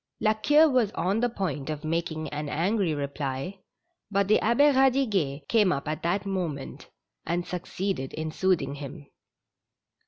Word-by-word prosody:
La 215 - +3
Queue 295 +8 +5
was 250 -7 +2
on 195 +5 0
the 245 +1 +2
point 185 - -3
of 150 -1 -4
making 160 -1 -2
an 150 0 -4
angry 180 +1 +1
reply, 140 +4 -4 0.5
but 200 -1 +1
the 215 - +4
Abbe 235 +6 +3
Eadiguet 215 - +2
came 210 -5 +4
up 140 +1 -2
at 155 0 -3
that 185 +4 0
moment, 175 -8 -4 0.3
and 175 +1 -1
succeeded 180 -5 -3
in 155 0 -4
soothing 165 -6 +1
him. 145 +1 -8
175 Hz, 150 wpm, -27 LUFS, 150-210 Hz, 0.5 s, Queue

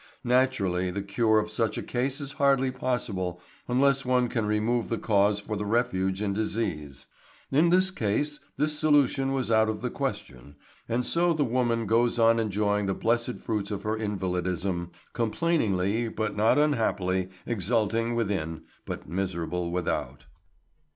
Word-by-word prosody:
Naturally 110 -8 +1
the 100 +2 -3
cure 110 +2 +2
of 105 0 0
such 110 -1 -1
a - - -3
case 130 +3 -2
is 140 -1 -5
hardly 135 -2 +2
possible 100 -9 -2 0.3
unless 135 +2 +3
one 125 -1 +2
can 115 -4 -1
remove 110 +3 0
the 115 - -1
cause 100 -1 +2
for 105 +1 -5
the 105 - -3
refuge 95 -4 0
in 100 -1 0
disease. 90 -10 -3 0.5
In 155 +5 +4
this 185 +2 +3
case 145 - -1 0.2
this 150 0 +1
solution 145 -3 +3
was 130 -4 -1
out 110 0 +4
of 105 -1 -3
the 125 -1 -2
question, 65 +3 -5 0.3
and 120 +2 0
so 170 0 +2
the 155 -2 +1
woman 120 -2 0
goes 115 +3 +2
on 115 0 +4
enjoying 105 -1 0
the 95 - 0
blessed 120 +2 0
fruits 105 -3 -2
of 100 -2 -4
her 110 +1 -1
invalidism, 95 -3 -2 0.2
complainingly 115 - 0
but 110 -1 -3
not 110 +5 +3
unhappily, 95 -11 +1 0.2
exulting 115 +2 0
within, 95 -8 -2 0.2
but - - -6
miserable 90 -1 -2
without. 90 0 -3
110 Hz, 150 wpm, -27 LUFS, 100-125 Hz, 0.5 s, In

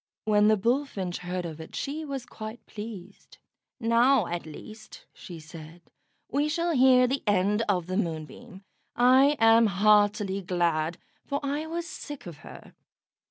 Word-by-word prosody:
When 210 -1 +4
the 215 0 +4
Bullfinch 230 -5 -1
heard 180 0 -4
of 160 -1 -7
it 160 - -11
she 295 +3 -4
was 275 -4 -5
quite 220 -1 -9
pleased. 205 -3 -10 0.4
"Now, 235 +1 +3
at 175 -2 -5
least," 215 +7 -12
she 175 -4 -10
said, 155 +2 -12 0.4
"we 290 +2 0
shall 340 +2 0
hear 255 -3 +5
the 265 +2 -1
end 205 +2 +2
of 180 -4 +1
the 185 +2 -3
Moonbeam. 185 +4 -5 0.3
I 260 +4 +5
am 225 0 +6
heartily 205 0 +2
glad, 170 -3 -1 0.3
for 280 0 -1
I 290 +3 -2
was 335 +1 -4
sick 295 -6 -8
of 170 -4 -9
her." - - -13
215 Hz, 150 wpm, -27 LUFS, 180-260 Hz, 0.4 s, am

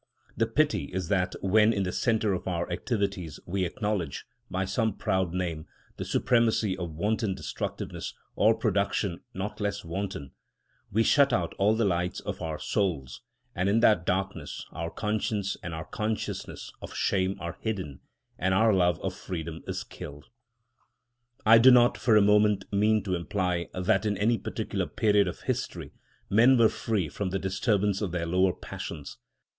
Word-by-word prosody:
The 115 +1 +1
pity 150 +6 +1
is 95 -1 -4
that 95 -3 +1
when 105 +3 +5
in 100 -3 0
the 90 - -2
centre 110 -3 +1
of 90 - -4
our 85 -2 -1
activities 100 - -2
we 95 +1 -1
acknowledge, 100 -5 -3 0.2
by 95 +1 -1
some 110 +2 0
proud 95 -2 0
name, 85 -3 -3 0.3
the - - -4
supremacy 115 -5 +2
of 85 -4 -5
wanton 105 +2 0
destructiveness, 70 -8 -5 0.2
or 110 +2 +4
production 100 -4 0 0.2
not 100 +3 -4
less 100 -2 -2
wanton, 85 -4 -4 0.6
we 110 +3 +3
shut 140 +3 +4
out 120 - 0
all 105 +3 +4
the 115 0 +1
lights 90 -1 0
of - - -6
our 80 -2 -3
souls, 70 - -2 0.3
and 90 +2 0
in 110 +3 +3
that 105 -7 +5
darkness 95 +2 -2
our 85 0 -4
conscience 105 0 -1
and 85 - -5
our 80 -1 -5
consciousness 110 0 -4
of - - -8
shame 95 0 +1
are 85 -1 -6
hidden, 95 -11 -3 0.4
and 95 +2 +2
our 110 +2 +4
love 90 -2 +3
of 95 - -2
freedom 85 -4 -6
is - - -3
killed. 75 0 -10 1.2
I 115 +1 +8
do 125 +3 +8
not 120 -1 +6
for 115 -3 +3
a 105 - +6
moment 105 -1 +4
mean 105 +1 +3
to 95 -2 -2
imply 90 0 -1
that 95 +3 +1
in 105 -1 0
any 115 +4 +2
particular - - -3
period 105 -2 +3
of 90 - -5
history - - -3 0.3
men 120 +6 +5
were 115 -2 +6
free 105 -8 -1
from 95 +6 -3
the 95 - -1
disturbance 100 +1 0
of 100 -5 -2
their 85 -1 -2
lower 90 +2 +2
passions. 70 - -7
95 Hz, 165 wpm, -28 LUFS, 90-110 Hz, 1.2 s, I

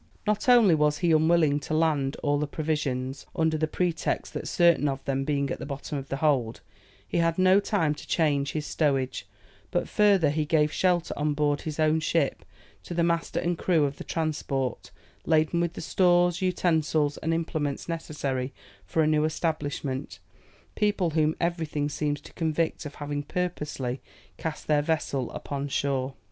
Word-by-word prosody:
Not 210 +3 0
only 235 -7 +7
was 150 -1 +2
he 175 0 +1
unwilling 155 -2 +4
to 150 +2 -3
land 150 -4 +1
all 145 -1 +2
the 150 - -1
provisions, 140 -4 -2
under 160 -2 +2
the 155 0 0
pretext 170 0 -1
that - - -4
certain 170 -4 +4
of 135 -1 -3
them 135 0 -1
being 140 -1 0
at - - -3
the - - -5
bottom 140 +1 -5
of 135 -1 -5
the 135 - -2
hold, 135 -7 +1 0.5
he - - -1
had 165 -1 +1
no 185 +1 +5
time 190 -7 +1
to 150 - -11
change 145 -4 +1
his 150 -1 -2
stowage, 135 -9 0 0.4
but 175 - -1
further 195 -8 +4
he 155 +1 0
gave 150 0 +2
shelter 180 -2 +1
on 150 0 0
board 145 -1 +1
his 155 -1 -5
own 155 0 +3
ship 155 -2 0 0.4
to 175 - -7
the 170 - +2
master 170 0 0
and 175 -1 -1
crew 165 -5 +2
of 140 0 -3
the - - -7
transport, 140 -5 -2 0.4
laden 160 +1 +3
with 170 -1 0
the - - -7
stores, 175 -1 +3
utensils, 160 -5 +1
and 160 - -2
implements 160 -3 -2
necessary 140 -6 -3 0.4
for 160 - +2
a - - +2
new 155 -1 +3
establishment, 150 -4 -2 0.6
people 205 -5 +1
whom 155 0 +2
everything 160 -4 -1
seems 145 0 -2
to - - -14
convict 160 -1 -1
of 145 - -11
having 145 0 -3
purposely 145 -6 -3 0.4
cast 160 -2 -4
their 150 -1 +3
vessel 145 -5 -1
upon 140 0 -4
shore. 135 -1 -1
155 Hz, 175 wpm, -27 LUFS, 145-170 Hz, 0.6 s, only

